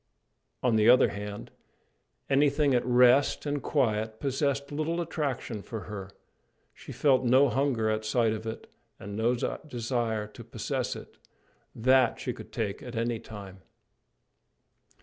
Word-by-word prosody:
On 120 -3 +3
the 110 +1 +5
other 125 - +6
hand, 105 0 -7 0.8
anything 140 0 +3
at 125 - +2
rest 125 +4 +4
and 145 -1 -1
quiet 110 -6 0
possessed 140 0 -1
little 155 +3 -1
attraction 140 -9 -3
for 110 +1 -6
her; 95 0 -7 0.6
she - - -11
felt 135 -4 +3
no 130 +3 +5
hunger 130 -4 +1
at 110 0 0
sight 110 0 +1
of 110 +1 -6
it, 110 - -6 0.3
and 100 +1 -7
no 115 +3 +2
desire 120 -4 -2
to 105 - -12
possess - - -3
it: - - -12 0.6
that 130 +1 +3
she - - -3
could - - -11
take 100 -3 -3
at 125 -1 -8
any 115 0 -1
time. 100 -4 -10
120 Hz, 140 wpm, -28 LUFS, 110-135 Hz, 0.8 s, other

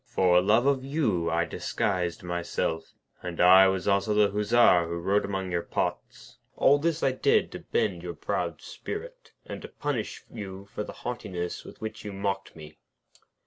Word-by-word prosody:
For 90 -1 +4
love 110 +6 +3
of 140 -2 +2
you 135 - 0
I 85 +1 +1
disguised 90 0 -2
myself; 85 -2 -3 0.3
and 90 -1 -6
I 95 +2 +8
was 95 0 -1
also 100 +1 +2
the 105 -1 +4
Hussar 105 -4 +4
who 85 - -3
rode 95 +4 +1
among 95 -2 -3
your 85 -1 0
pots. - - -4 0.2
All 145 +1 +4
this 165 +1 -1
I 135 - +4
did 430 - +2
to - - -7
bend 465 +1 -1
your - - -6
proud - - -3
spirit, - - -8
and - - -7
to - - -8
punish 140 -7 -4
you 95 -1 -8
for 105 - -3
the - - -7
haughtiness 90 -8 -4
with - - -13
which 110 0 -6
you 105 - -6
mocked 95 0 -3
me.' 75 -1 -12
100 Hz, 175 wpm, -27 LUFS, 90-120 Hz, 0.3 s, I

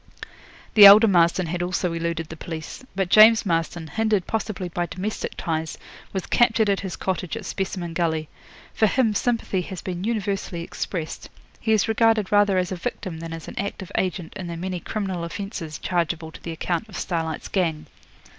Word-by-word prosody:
The 205 -2 +11
elder 210 +3 +9
Marston 175 -1 +3
had 175 +2 -3
also 180 -1 -1
eluded 165 -1 -3
the 160 - -7
police. 160 +6 -7
But 190 -2 0
James 220 +1 +8
Marston, 165 -1 -1
hindered 215 +3 0
possibly 215 -4 -3
by 175 0 -2
domestic 195 +6 -4
ties, 160 -1 -3 0.3
was 190 -2 -3
captured 225 -3 +3
at 195 - +1
his 190 -2 -5
cottage 185 +2 -3
at 220 - -7
Specimen 185 -3 -3
Gully. 160 -2 0 0.5
For 220 - +3
him 225 0 +2
sympathy 225 -3 0
has 180 0 -7
been 180 -1 -4
universally 200 -5 -2
expressed. 165 -1 -5 0.3
He 220 - -1
is 215 -1 +3
regarded 225 -2 +2
rather 205 -2 +4
as 180 0 0
a - - -1
victim 170 0 -5
than 165 0 -7
as 165 -1 -7
an - - -7
active 195 -2 -4
agent 180 -3 -2
in 185 - -5
the 170 -1 -5
many 180 +1 -3
criminal 190 -3 -3
offences 170 -3 -5
chargeable 170 -2 -2
to - - -13
the 170 - -5
account 170 +5 -2
of 200 - -8
Starlight's 165 -3 -3
gang. 160 -5 -1
185 Hz, 180 wpm, -24 LUFS, 170-205 Hz, 0.5 s, The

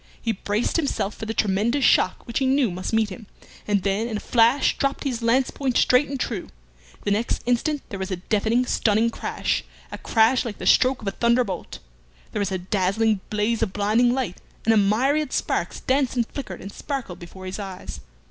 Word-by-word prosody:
He 230 - -1
braced 210 - -1
himself 275 -9 -1
for 220 - -7
the 225 - -2
tremendous 220 +7 +1
shock 185 - +3
which 235 - -2
he 265 - +1
knew 265 -5 +2
must 185 +1 -4
meet 220 -2 +1
him, 210 +2 -9 0.4
and 200 -3 +1
then 200 +3 0
in 220 -3 -3
a - - -4
flash 240 +5 +3
dropped 275 +1 -1 0.2
lance 245 +3 +2
point 265 -3 -1
straight 255 +3 +4
and 275 -1 -4
true. 215 -7 -3 0.5
The 205 - 0
next 215 +4 0
instant 265 +5 0
there 200 -5 -6
was 190 0 -3
a 185 - -1
deafening 220 +6 +1
stunning 225 0 +2
crash - - -2 0.3
a - - -6
crash 230 +3 +3
like 220 -4 -5
the - - -7
stroke 260 -2 +4
of - - -6
a - - +1
thunder 235 +4 +2
bolt. 185 -6 -6 0.5
There - - -3
was 200 -2 -1
a 190 - 0
dazzling 195 +3 +1
blaze 215 +2 0
of 195 -4 0
blinding 215 +4 +3
light, 245 -8 -2 0.3
and 225 - +5
a - - +3
myriad 260 +9 +2
sparks - - -1
danced 265 0 +1
and 240 -2 +1
flickered 215 -8 -7
and 195 - -8
sparkled 265 - -5
before 185 +2 -10
his 185 +3 -5
eyes. 190 - -7
225 Hz, 205 wpm, -24 LUFS, 200-250 Hz, 0.5 s, and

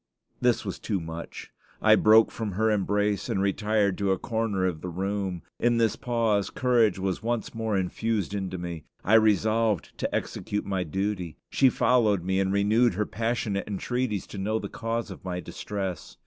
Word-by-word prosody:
This 125 -2 +2
was - - -4
too 100 -4 -2
much. 80 0 -8 0.3
I - - +5
broke 110 +1 +6
from 110 -4 -4
her 110 +3 +2
embrace 105 0 0
and - - 0
retired 100 0 +1
to 100 -1 +1
a 95 - +2
corner 110 -3 -1
of 85 -4 -2
the 90 - -4
room. 95 0 -3 0.2
In 120 0 +2
this 115 -2 +2
pause, 115 -5 0
courage 120 -6 +2
was 95 -1 -2
once 120 0 -2
more 110 -3 -1
infused 100 +2 -1
into 95 -2 -3
me. 85 -3 -6 0.2
I 105 - +1
resolved 110 -3 +3
to - - -1
execute 105 - -3
my 95 -2 -1
duty. 90 0 -3
She 135 - +5
followed 110 -7 +2
me, 95 +1 0
and 95 0 +1
renewed 105 +2 +3
her 105 +2 0
passionate 115 -3 -2
entreaties 105 +1 -2
to 100 - -7
know 110 +3 0
the - - -5
cause 115 -1 -3
of 95 - -10
my 90 -1 -3
distress. 95 -2 -5
105 Hz, 175 wpm, -27 LUFS, 95-115 Hz, 0.3 s, broke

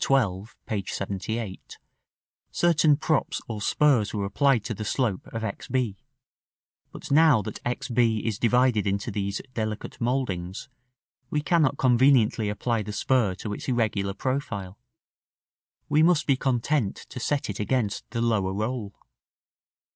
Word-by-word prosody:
XII. 105 -8 +1 0.2
(p. 105 -3 -2
78), 100 +1 -4 0.7
certain 160 -4 +3
props 155 -1 0
or 110 -3 -5
spurs 120 -4 +2
were 100 -1 -1
applied 125 +3 +2
to 115 - -2
the 110 +1 -5
slope 105 -3 -1
of 115 -1 -5
X 105 -3 -5
b; 125 -5 0 1.0
but - - -9
now 150 -7 +5
that 105 - -6
X 120 0 -3
b 115 -2 +2
is 110 -3 -2
divided 120 -3 +3
into 100 +3 -1
these 100 0 -2
delicate 110 -1 -4
mouldings, 100 -8 -2 0.6
we 150 - 0
cannot 150 -3 +2
conveniently 125 -4 +4
apply 115 +2 -1
the 105 0 -5
spur 105 -2 +1
to 105 +2 -5
its - - -7
irregular 105 -6 0
profile; 105 -9 -3 1.1
we 150 - +3
must 165 -1 +4
be 140 - +3
content 130 -2 0
to - - -9
set 145 +4 -1
it 105 - -5
against 105 -1 -1
the 115 0 -2
lower 100 -5 +1
roll. 110 -1 -3
115 Hz, 140 wpm, -26 LUFS, 105-130 Hz, 1.1 s, now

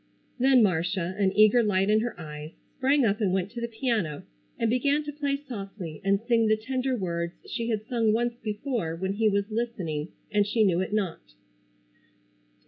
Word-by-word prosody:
Then 260 -1 +5
Marcia, 180 -1 0
an 195 -2 +3
eager 215 +3 +6
light 195 -3 +2
in 215 - +5
her 235 -4 -3
eyes, 150 0 -8 0.3
sprang 270 0 +3
up 210 +1 +1
and 195 -3 +2
went 190 +1 -1
to 235 - -6
the 235 - -1
piano, 220 - -2 0.3
and 230 - +1
began 280 +6 +2
to 295 0 -6
play 285 -1 -1
softly 200 - -7
and 195 +1 +2
sing 230 -2 +3
the 215 0 +3
tender 255 +3 -1
words 170 -3 -2
she 230 -2 -3
had 215 -2 -1
sung 230 -2 +1
once 240 +2 +1
before 215 - -2
when 190 +3 -2
he 215 +1 +2
was 200 +1 -1
listening 185 -10 -2 0.2
and 205 -1 +2
she 220 +1 +2
knew 180 -4 +3
it 185 - -2
not. 190 - -3
215 Hz, 185 wpm, -27 LUFS, 185-240 Hz, 0.3 s, eager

